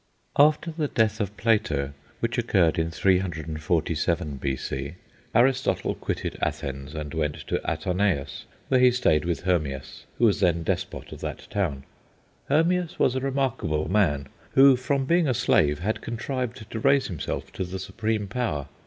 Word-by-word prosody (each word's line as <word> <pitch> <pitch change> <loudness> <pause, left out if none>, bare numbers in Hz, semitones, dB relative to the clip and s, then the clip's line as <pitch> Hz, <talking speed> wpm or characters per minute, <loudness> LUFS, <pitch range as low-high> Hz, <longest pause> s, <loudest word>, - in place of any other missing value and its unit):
After 150 +3 +4
the 155 -2 -1
death 110 -4 +1
of 105 -1 -3
Plato, 80 -12 +1 0.3
which 120 +2 0
occurred 95 -9 +2
in 80 0 0
347 85 -3 0
B.C., 65 +2 -3 0.4
Aristotle 125 +3 +2
quitted - - -4
Athens 70 +1 -3
and 75 -2 -5
went 75 -2 -1
to - - -1
Atarneus, 90 -6 -1 0.2
where 130 - +4
he 125 0 +7
stayed 105 -12 +2
with 85 -2 -2
Hermias, 75 -7 -2
who 120 - +4
was 105 - +3
then 85 -3 +2
despot - - -3
of - - -9
that - - -5
town. 85 -10 -1 0.7
Hermias 170 +4 +2
was 125 - +3
a 130 - 0
remarkable 130 - -1
man, 75 -10 +2 0.3
who, 135 0 +8
from 135 +2 -1
being 170 +1 +3
a 130 - +1
slave, 75 -11 +3
had 100 +8 -2
contrived 120 -1 -4
to 115 - -3
raise 135 +3 +3
himself 85 -6 -4
to 95 - -3
the 90 +1 -5
supreme 105 +2 -2
power. 95 - -2
95 Hz, 155 wpm, -26 LUFS, 75-125 Hz, 0.7 s, who